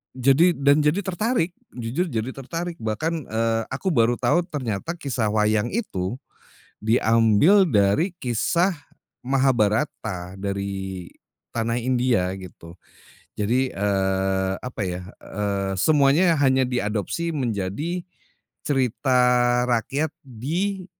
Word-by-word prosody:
jadi 135 +7 +4
dan 140 +2 +4
jadi 150 +6 +2
tertarik, 190 -1 0 0.2
jujur 125 +9 -2
jadi 115 +2 -2
tertarik 165 +6 -5
bahkan, 155 +8 -2
eee, 115 0 0
aku 140 +9 -4
baru 120 0 +3
tahu 165 +8 +2
ternyata 135 - -3
kisah 125 -7 -1
wayang 110 +1 +2
itu, 120 - -2 0.7
diambil 115 - +4
dari 105 - +2
kisah 170 - +1 0.5
Mahabharata 110 -7 0
dari 95 -2 -4 0.4
tanah 115 +1 -1
India 120 -6 +1
gitu. 85 -2 -12 0.6
Jadi, 125 +5 +1
eee, 95 -1 0
apa 125 -4 -6
ya, 90 0 -4 0.2
eee, 100 -1 -2
semuanya 155 - +4
hanya 130 -2 +3
diadopsi 120 - -2
menjadi 125 - -2 0.7
cerita 130 -2 +1 0.5
rakyat 135 +6 0
di, 170 - -3
120 Hz, 105 wpm, -23 LUFS, 105-150 Hz, 0.7 s, jadi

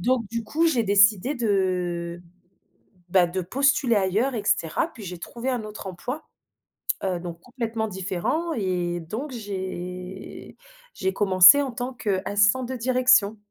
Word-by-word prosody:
Donc, 245 +5 +1
du 230 0 -3
coup 325 +8 +1
j'ai 250 -8 +2
décidé 205 +5 +4
de, 180 -6 -1 0.9
bah, 180 -2 +5
de 185 +2 -3
postuler 260 - +2
ailleurs 205 +7 +1
et 215 - -3
cetera 165 - 0
puis 225 - -11
j'ai 180 -1 -7
trouvé 235 +8 -5
un 245 -4 -2
autre 210 -1 -8
emploi, 250 - -6 0.8
heu, 185 -2 -1
donc, 170 -1 -7
complètement 230 -3 -3
différent, 210 - -2
et 180 -5 -2
donc 235 - -6
j'ai 185 -4 -7 0.4
j'ai 190 0 -1
commencé 190 +6 +7
en 275 -2 -3
tant 245 +2 -5
qu'assistante 210 +2 +1
de 260 - -3
direction 250 -4 +3
205 Hz, 140 wpm, -24 LUFS, 185-250 Hz, 0.9 s, commencé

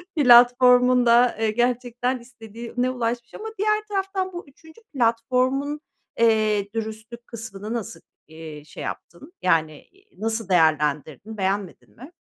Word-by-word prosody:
platformun 250 -1 +6
da, 235 0 +4
eee, 220 -1 +1
gerçekten 245 +1 -1
istediğine 235 +1 -5
ulaşmış 240 -1 -3
ama 440 - -7
diğer 425 +1 +1
taraftan 385 -2 -2
bu 345 -3 -8
3'üncü 320 +9 -19
platformun, 255 +4 0 0.4
eee, 215 -3 +2
dürüstlük 225 +2 -7
kısmını 215 -1 -7
nasıl, 230 -1 -5 0.3
eee, 160 -2 -10
şey - - -10
yaptın, 290 - -8
yani 160 -4 +1
i 390 - -24
nasıl 225 -2 -2
değerlendirdin, 155 - 0
beğenmedin 195 -1 -3
mi? 275 +9 -13
235 Hz, 120 wpm, -23 LUFS, 215-255 Hz, 0.4 s, platformun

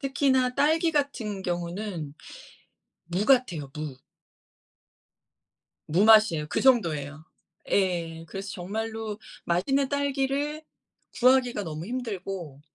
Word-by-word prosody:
특히나 265 -2 +2
딸기 315 +4 +3
같은 230 -9 -1
경우는 175 -3 -4 0.9
무 180 +4 -1
같아요, 180 - +2
무. 150 -4 -5 1.9
무맛이에요. 195 -3 +5
그 - - 0
정도예요. 155 - +2 0.5
예 170 -4 0
그래서 195 +2 -6
정말로 220 +3 -4 0.3
맛있는 265 +11 +1
딸기를 285 +2 -1 0.6
구하기가 250 -3 +4
너무 160 -1 -6
힘들고 195 - -5
210 Hz, 220 characters per minute, -27 LUFS, 170-265 Hz, 1.9 s, 무맛이에요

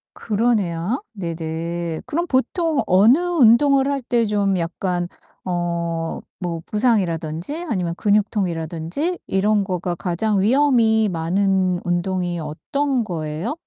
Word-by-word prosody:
그러네요. 210 - 0
네네. 165 -2 -4
그럼 340 +3 -2
보통 305 +3 +1
어느 210 - +6
운동을 275 -5 +4
할 280 -1 -1
때 235 -1 +1
좀 200 -2 +1
약간 175 +1 -2 0.4
어 170 -2 -2 0.2
뭐 170 -2 -3
부상이라든지 200 - 0
아니면 180 -5 -1
근육통이라든지 195 - 0
이런 205 +1 +2
거가 180 -2 -2
가장 190 +4 0
위험이 230 -3 +3
많은 185 +1 +1
운동이 175 0 -1
어떤 255 - -2
거예요? 165 - -4
190 Hz, 250 characters per minute, -21 LUFS, 170-235 Hz, 0.4 s, 어느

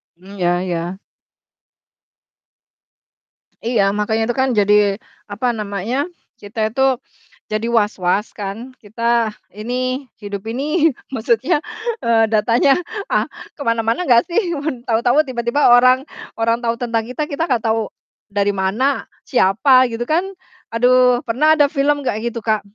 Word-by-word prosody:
Mmm, 190 +3 -13
ya 175 0 +1
ya. 175 0 -3 2.7
Iya 230 -4 +2
makanya 210 +2 -1
itu 240 - 0
kan 265 - +2
jadi 205 -2 +3 0.6
apa 245 +5 -2
namanya 205 +3 -3 0.4
kita 215 +1 -3
itu, 255 +4 -3 0.7
jadi 215 +1 -2
was-was 205 -1 0
kan 200 -1 -4 0.3
kita 220 +3 -11 0.6
ini 220 +3 -4 0.5
hidup 200 -1 -6
ini 305 +4 +1 0.2
maksudnya, 250 - +1 0.5
eee, 225 -1 +4
datanya, 230 +5 +3 0.3
ah, - - +1 0.3
ke 290 - -10
mana-mana 230 +8 0
ga 240 -5 +5
sih, 345 -1 0
mun 260 -5 -4
tau-tau 245 +6 +2
tiba-tiba 240 +1 +2
orang 255 +2 +5 0.3
orang 230 +1 +1
tahu 230 0 0
tentang 230 -2 -1
kita 295 +4 -2
kita 305 +4 -3
gak 240 -3 0
tahu, 220 -1 0 0.4
dari 200 0 0
mana, 210 +9 0 0.2
siapa 255 +4 +4
gitu 230 +1 -4
kan, 345 +8 0 0.4
aduh 250 +1 +3
pernah 305 +7 +3
ada 295 - +5
film 285 -1 0
kayak 230 0 -1
gitu 235 - -6
Kak, 215 -2 +1
230 Hz, 130 wpm, -19 LUFS, 210-260 Hz, 2.7 s, ga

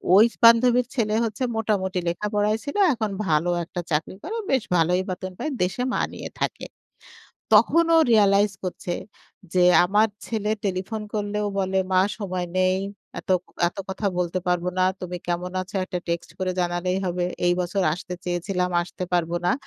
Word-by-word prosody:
ওই 210 +3 +8 0.2
বান্ধবীর 240 +1 +6
ছেলে 215 -3 +1
হচ্ছে 225 +2 -3
মোটামুটি 190 -4 0
লেখাপড়ায় 210 +4 0
ছিল, 285 - -6 0.2
এখন 220 -4 -2 0.2
ভালো 160 +3 +2
একটা 175 +1 -5
চাকরি 150 +4 -1
করে, 405 +9 -4 0.2
বেশ 265 -4 +2
ভালোই 175 +3 +2
বেতন 185 +1 -4
পায়, 310 - -3
দেশে 185 +7 -1
মা - - +1
নিয়ে - - -7
থাকে। - - -2 0.9
তখন 275 +11 +5
ও - - +7
রিয়ালাইজ 205 -1 +4
করছে 180 -1 -4 0.6
যে, 180 -1 +5 0.2
"আমার 210 +4 +3 0.2
ছেলে 215 -2 -2
টেলিফোন 195 +3 -2
করলেও 210 0 -1
বলে, 190 0 +1
'মা 185 0 +5 0.2
সময় 185 -4 -3
নেই, 185 0 +3 0.4
এত - - -9
ক - - -70 0.2
এত - - -16
কথা 195 +2 -3
বলতে 180 +1 0
পারব 180 -1 +1
না। 185 - +4 0.2
তুমি 180 -1 -5
কেমন 175 +1 -2
আছো? 190 +2 -8
একটা 180 - -4
টেক্সট 170 0 -2
করে 185 -1 -1
জানালেই 175 +1 0
হবে। 180 0 -1 0.2
এই 175 - +4
বছর 185 +2 -1
আসতে 180 0 -7
চেয়েছিলাম, 180 +1 -1
আসতে 180 +1 -6
পারব 170 -2 +1 0.2
না।'" - - +4
185 Hz, 170 wpm, -24 LUFS, 180-210 Hz, 0.9 s, ওই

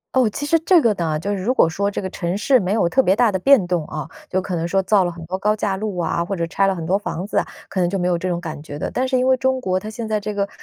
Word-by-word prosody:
哦， 255 -4 +4
其 285 +7 -5
实 330 +2 +3
这 350 +2 +5
个 235 -7 +3
呢， 160 -5 -2
就 200 +5 -3
是 190 - -4
如 245 +7 0
果 - - +5
说 200 +5 -1
这 205 - -4
个 190 - -3
城 180 0 -3
市 255 +4 +3
没 190 +1 -1
有 215 -6 +2
特 265 +9 +3
别 190 -6 +3
大 230 -1 +3
的 190 - -1
变 265 -1 +5
动 175 -3 -1
啊， 155 0 -6 0.2
就 185 - 0
可 185 -1 -3
能 165 0 -1
说 195 +2 +1
造 195 0 +3
了 175 - -1
很 170 -1 -10
多 185 +3 -4
高 210 +2 +2
架 205 -2 -1
路 200 -2 -4
啊， 170 0 0
或 195 +3 -3
者 170 -1 -1
拆 195 +4 +1
了 195 - +1
很 165 -2 -5
多 185 +4 +1
房 185 -3 -4
子 205 - 0
啊， - - -3 0.2
可 195 - -4
能 175 - +2
就 195 - -1
没 180 0 0
有 180 - +2
这 185 +2 -2
种 175 -1 -1
感 160 -4 -6
觉 145 -1 -8
的。 - - -4
但 260 +1 0
是 255 - +1
因 250 - +1
为 260 0 +4
中 260 0 +1
国 185 -5 -1
它 210 - -7
现 220 0 -6
在 215 -1 0
这 210 0 -5
个 200 0 0
195 Hz, 375 characters per minute, -21 LUFS, 175-215 Hz, 0.2 s, 这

